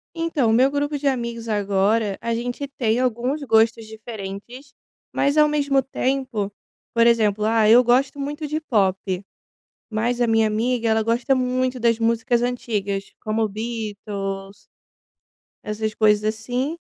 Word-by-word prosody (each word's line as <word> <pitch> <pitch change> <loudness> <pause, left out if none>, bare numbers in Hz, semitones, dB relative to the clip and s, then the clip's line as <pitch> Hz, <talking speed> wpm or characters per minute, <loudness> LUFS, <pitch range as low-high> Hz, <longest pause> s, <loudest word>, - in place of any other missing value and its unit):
Então 330 -7 0
o 220 - +3
meu 260 +4 +5
grupo 290 +1 -1
de 280 0 -2
amigos 235 -3 -2
agora, 205 0 +1
a 235 0 -2
gente 245 +4 -4
tem 230 -1 +1
alguns 255 +4 -1
gostos 225 -2 +3
diferentes, 220 +4 -9 0.4
mas 285 +2 +1
ao 300 - +6
mesmo 285 -2 +2
tempo, 260 -6 -2 0.4
por 230 0 +4
exemplo, 215 -3 +2
ah, 220 -1 +3
eu 240 +3 +8
gosto 260 +4 +2
muito 295 +2 -4
de 305 +2 -2
pop, 200 -10 +1 0.9
mas 235 +3 -1
a 240 - +2
minha 225 0 +3
amiga 230 +2 0
ela 220 0 +2
gosta 240 +4 +1
muito 255 0 -1
das 230 -1 +2
músicas 230 +1 +1
antigas 205 -5 -2
como 220 0 0
Beatles 205 -3 -5 1.1
essas 215 0 -3
coisas, 210 -1 +3
assim, 245 +7 -2
230 Hz, 140 wpm, -22 LUFS, 215-255 Hz, 1.1 s, eu